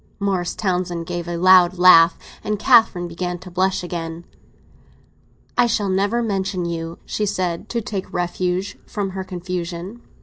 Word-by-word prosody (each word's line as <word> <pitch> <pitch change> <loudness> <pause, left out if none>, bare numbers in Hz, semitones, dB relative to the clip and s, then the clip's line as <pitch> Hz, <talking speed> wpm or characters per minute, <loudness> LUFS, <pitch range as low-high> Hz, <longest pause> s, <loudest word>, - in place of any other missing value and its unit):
Morris 190 -3 -1
Townsend 180 -3 -2
gave 175 0 -4
a 175 0 -3
loud 185 0 +5
laugh, 170 -2 +7 0.3
and 210 0 -1
Catherine 215 -6 +4
began 175 +1 -4
to 180 +1 -12
blush 185 +1 0
again. 170 -1 -5 1.3
"I 245 - +4
shall 210 -3 0
never 200 +5 +1
mention 195 -4 -2
you," 165 -1 -4
she 210 - -2
said, 185 -1 -2
to 235 - -2
take 200 -3 -5
refuge 180 +2 -2
from 200 -4 -3
her 190 0 -5
confusion. 180 +3 -6
185 Hz, 145 wpm, -21 LUFS, 175-195 Hz, 1.3 s, laugh